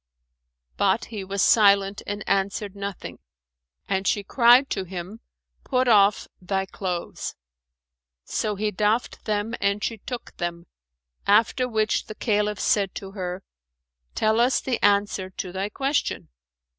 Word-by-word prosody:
But 200 +3 +2
he 205 -3 -4
was 195 +1 -1
silent 200 -2 +4
and 205 0 -5
answered 200 +1 -1
nothing; 200 -1 -6 0.7
and 190 -1 -1
she 205 - +1
cried 245 +5 +5
to 195 - -1
him, 185 +4 -7 0.4
"Put 255 -1 +1
off 205 -3 +4
thy 190 +1 -1
clothes." 180 -3 -4 0.9
So 210 -2 -2
he 210 +1 -1
doffed 210 +4 0
them 215 +1 -1
and 200 +1 +1
she 225 -2 -2
took 245 +3 -7
them; 170 0 -4 0.6
after 230 +5 +3
which 220 -1 0
the 215 - -8
Caliph 210 -3 0
said 200 -3 +1
to 195 -1 -7
her, 185 -1 -5 0.7
"Tell 220 +1 +2
us 245 +2 +3
the 250 -3 -2
answer 200 -2 +2
to 185 -1 -6
thy 190 +2 -3
question." 275 +6 -1
205 Hz, 135 wpm, -24 LUFS, 195-220 Hz, 0.9 s, cried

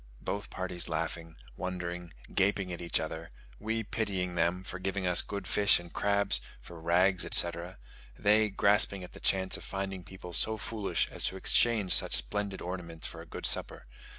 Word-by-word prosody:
Both 100 - -4
parties 90 -2 -2
laughing, 80 0 -4 0.2
wondering, 90 0 -5 0.2
gaping 95 -1 +1
at 85 - -7
each 85 - 0
other; 80 +1 -6 0.3
we 110 +1 -2
pitying 100 -5 -2
them, 85 +2 0
for 95 0 -7
giving 95 0 -2
us 90 -1 +6
good 100 0 -6
fish 105 0 +4
and 85 -1 -13
crabs 100 -1 +1 0.2
for 85 -2 -12
rags, 90 +3 +2
etc.; 85 +1 +2 0.4
they 105 +1 +3
grasping 100 -1 +3
at 90 - -11
the - - -11
chance 95 -1 +1
of - - -12
finding 95 -1 -5
people 90 -1 -11
so 110 +5 +3
foolish 105 0 -2
as - - +2
to 95 - 0
exchange 105 -1 +3
such - - +4
splendid 100 -2 -2
ornaments 85 -3 -6
for - - -7
a - - -13
good - - -7
supper. - - +1
95 Hz, 175 wpm, -30 LUFS, 85-100 Hz, 0.4 s, us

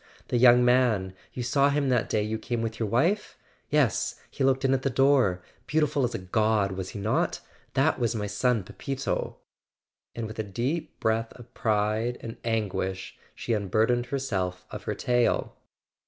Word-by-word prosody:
The 125 - +1
young 125 0 +7
man—you 120 -3 +1
saw 140 +3 +3
him 140 -1 +1
that 125 -3 +1
day 105 -1 +1
you 110 +1 -2
came 115 +1 -2
with 115 0 -4
your 110 -3 -1
wife? 170 - +1 0.3
Yes—he 140 -1 0
looked 135 0 +2
in 135 - +3
at 135 - +1
the 135 - 0
door: 130 -9 +3 0.2
beautiful 150 -2 +1
as 120 - -1
a - - 0
god, 105 +1 +1
was 95 -1 -5
he - - -7
not? 105 +3 0 0.4
That 135 +3 +2
was 120 -1 0
my 105 -2 -2
son 110 +2 +1
Pepito!" 135 +8 -4 0.8
And 115 - -3
with 110 0 -8
a - - 0
deep 120 - -3
breath 110 0 0
of 120 0 -15
pride 110 +2 0
and 115 0 -7
anguish 100 -4 -2 0.2
she 120 - -2
unburdened 110 +4 +1
herself 95 -9 -2
of - - -7
her - - -2
tale. 120 -1 +1
115 Hz, 170 wpm, -27 LUFS, 105-130 Hz, 0.8 s, young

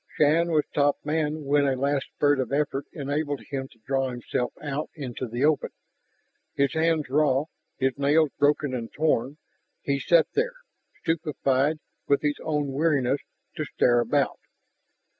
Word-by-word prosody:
Shann 160 +3 +4
was 155 -2 +3
top 145 0 +3
man 150 0 -1
when 140 0 +3
a 135 - +1
last 140 +1 0
spurt 145 -1 +3
of 130 -1 -2
effort 140 -1 -1
enabled 145 0 -2
him 135 -1 -3
to 120 - -22
draw 135 -1 0
himself 125 0 -3
out 145 0 -3
into 130 -4 -5
the 120 +5 0
open, 155 -1 +2 0.9
his 140 -1 +2
hands 160 -1 +1
raw, 140 0 +2 0.3
his 130 0 0
nails 145 +1 +3
broken 145 -1 +2
and 115 -2 -4
torn. 145 -3 0 0.5
He 140 0 0
sat 165 +5 +4
there, - - 0 0.5
stupefied 150 -3 +1 0.3
with 140 +1 +2
his 145 -1 0
own 150 -3 -1
weariness, 140 -2 +1 0.4
to - - -1
stare 120 -1 +2
about. 120 - +1
145 Hz, 150 wpm, -26 LUFS, 135-150 Hz, 0.9 s, Shann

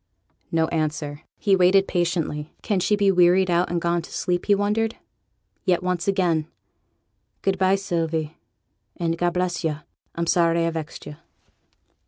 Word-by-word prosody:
No 160 -1 +2
answer. 150 -2 -2 0.2
He 200 -3 +3
waited 190 +1 +4
patiently. 165 -4 -2
Can 200 -3 0
she 210 +3 +2
be 200 -1 +3
wearied 180 0 +4
out, 175 +1 +2
and 175 - 0
gone 170 0 0
to - - -13
sleep, 175 -1 -2
he 205 - +5
wondered. 215 +3 0 0.7
Yet 180 -1 +1
once 180 -1 -1
again 175 -6 +1 1.0
'Good 195 -1 0
by, 190 0 +4
Sylvie, 165 -5 -2 0.6
and 165 -1 -1
God 175 +1 -1
bless 180 0 -1
yo'! 155 -2 -2 0.3
I'm 170 - -1
sorry 170 0 +2
I 165 - 0
vexed 160 -1 -6
yo'.' 150 - -9
175 Hz, 155 wpm, -23 LUFS, 165-190 Hz, 1.0 s, he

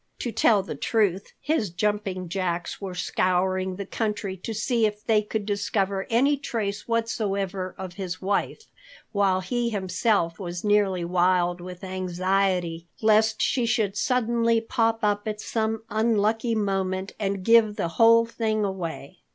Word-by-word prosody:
To 240 - -3
tell 210 -3 +3
the 190 - -5
truth, 195 +4 0
his 285 - 0
jumping 195 0 -2
jacks 175 0 -3
were 190 -2 -5
scouring 185 +1 0
the 200 +1 -5
country 210 -3 -3
to 185 - -6
see 225 +1 +1
if 210 0 -7
they 220 -2 +3
could 210 0 -4
discover 200 -1 -1
any 275 +5 +3
trace 220 -7 -3
whatsoever 200 -5 -2
of 185 -2 -6
his 180 -2 -4
wife, 200 - -1 0.5
while 195 -2 +2
he 235 +5 -1
himself 190 -3 0
was 175 -2 -5
nearly 205 -4 +2
wild 175 0 +2
with 180 +1 -9
anxiety 185 -2 -1
lest 220 0 +3
she 245 -3 +1
should 210 -4 +1
suddenly 230 0 +2
pop 225 0 0
up 205 0 +1
at 210 -1 -3
some 220 0 -2
unlucky 225 +1 +1
moment 195 -2 -1
and 195 -2 -2
give 225 -2 +5
the 170 - -2
whole 230 +6 +5
thing 220 -2 -1
away. 170 -7 -5
200 Hz, 145 wpm, -25 LUFS, 185-225 Hz, 0.5 s, give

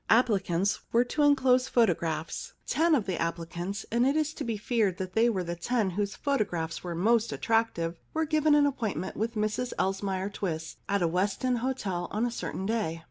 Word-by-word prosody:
Applicants 200 -5 +2
were 235 +1 +4
to 295 +4 -2
enclose 260 -3 +4
photo 230 -7 +4
graphs. 160 -1 -4
Ten 320 +4 +3
of 235 -8 0
the 185 -3 -2
applicants 170 +4 -3
— - - -33
and 235 +2 +3
it 275 +3 +3
is 310 0 0
to - - -5
be 230 -2 -2
feared 210 -4 0
that 185 -1 -5
they 230 +3 +4
were 190 -5 -1
the 170 0 -4
ten 210 +3 0
whose 200 +2 -2
photo 280 -5 +1
graphs 165 -4 -4
were 175 -2 -4
the - - -4
most 230 +1 +3
attractive 225 -7 0
— - - -38
were 320 0 +1
given 310 -1 +3
an 295 -1 +5
appointment 225 -9 -2
with 230 +2 -2
Mrs 215 +4 -1
Elsmere 195 0 -1
Twiss 160 -4 -4
at 200 -2 +2
a - - +3
West 190 +7 0
End 250 -2 +2
hotel 220 -8 -2
on 215 +3 0
a 240 - -1
certain 190 -4 -4
day. 210 -7 -1
210 Hz, 215 wpm, -29 LUFS, 180-245 Hz, -, an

